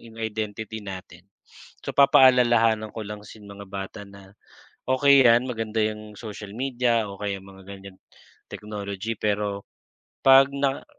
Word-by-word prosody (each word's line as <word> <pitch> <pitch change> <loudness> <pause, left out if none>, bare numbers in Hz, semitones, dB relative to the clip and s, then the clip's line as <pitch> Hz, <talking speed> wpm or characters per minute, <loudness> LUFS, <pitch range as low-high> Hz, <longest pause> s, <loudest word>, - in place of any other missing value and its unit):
'yong 115 -1 -15
identity 110 0 -5
natin. 95 -2 -9 0.6
So - - -4
papaalalahanan 120 -5 +5
ko 110 - -5
lang 105 0 -7
si - - -12
yung 100 -1 -11
mga 100 - -10
bata 95 +1 -7
na 100 -1 -15 0.6
okey 135 +1 +5
'yan 120 +2 +5
maganda 115 -2 -3
'yong 105 0 -5
social 105 -3 -8
media 120 -3 0
o 100 - -9
kaya 100 -1 -3
mga 95 0 -15
ganyan 100 -1 -11 0.5
technology, 105 +1 -5
pero 100 -1 -2 0.6
'pag 135 0 +7
na 140 -1 -1
110 Hz, 140 wpm, -24 LUFS, 100-120 Hz, 0.6 s, pag